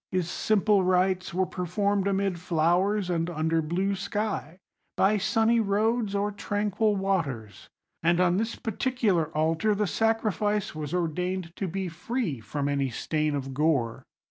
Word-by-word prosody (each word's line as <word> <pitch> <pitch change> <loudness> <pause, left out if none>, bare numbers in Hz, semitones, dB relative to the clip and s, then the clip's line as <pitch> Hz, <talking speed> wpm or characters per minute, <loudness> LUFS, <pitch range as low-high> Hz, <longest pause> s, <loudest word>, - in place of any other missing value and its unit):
His 185 -2 0
simple 210 -2 +2
rites 185 0 +1
were 185 +2 +1
performed 195 +3 -1
amid 195 -2 0
flowers 180 +4 +1
and 170 -1 -1
under 160 0 0
blue 180 +6 0
sky, 195 -4 -3 0.4
by 205 +2 +3
sunny 225 +3 +2
roads 215 +1 +1
or 205 +1 0
tranquil 205 +1 0
waters; 150 - -2 0.3
and 170 +1 +3
on 180 0 +3
this 225 +2 -1
particular 220 - 0
altar 165 +7 +2
the 210 +1 +1
sacrifice 210 -1 0
was 155 -2 -5
ordained 180 +1 -2
to 195 - -2
be 190 +2 -3
free 175 - -3
from 140 +5 -3
any 140 -2 0
stain 150 +5 -1
of 135 -1 -4
gore. 135 -6 +1
185 Hz, 145 wpm, -27 LUFS, 165-205 Hz, 0.4 s, by